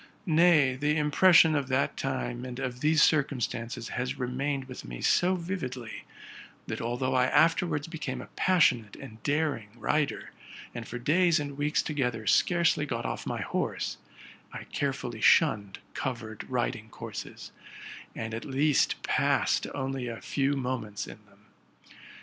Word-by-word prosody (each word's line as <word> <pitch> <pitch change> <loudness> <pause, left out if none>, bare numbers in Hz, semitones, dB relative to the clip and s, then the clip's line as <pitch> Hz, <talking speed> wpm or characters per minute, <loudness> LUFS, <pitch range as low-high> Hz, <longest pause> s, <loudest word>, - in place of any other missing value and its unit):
Nay, 160 -5 +5
the 150 +3 0
impression 160 +2 +5
of 145 -3 0
that 135 +1 0
time 125 -2 -3
and 125 -1 -6
of 130 -2 -4
these 155 +2 +4
circumstances 125 -6 0
has 125 +3 -3
remained 135 +2 -2
with 130 -1 -9
me - - -8
so 185 +2 +3
vividly, 130 - -5 0.6
that - - -4
although 125 +3 -1
I 125 -1 +4
afterwards 165 -1 +2
became 165 -1 -5
a - - -7
passionate 125 - +3
and 115 -5 -11
daring 145 -7 0
rider, 140 +5 -1 0.4
and 120 -2 -6
for - - -5
days 165 +6 +3
and 145 -1 -5
weeks 150 +2 0
together 125 -7 -2
scarcely 170 - +3
got 120 -3 -3
off - - -4
my - - -2
horse, - - -2 0.5
I - - -7
carefully 125 -5 -3
shunned 105 -12 +4 0.2
covered 115 -5 -5
riding - - -2
courses, - - -8 0.6
and 110 0 -5
at 115 - -4
least 140 +1 +1
passed - - +1
only 130 -1 -3
a 115 -1 -5
few 140 0 0
moments 125 -7 -3
in - - -11
them. - - -25
135 Hz, 145 wpm, -28 LUFS, 120-150 Hz, 0.6 s, Nay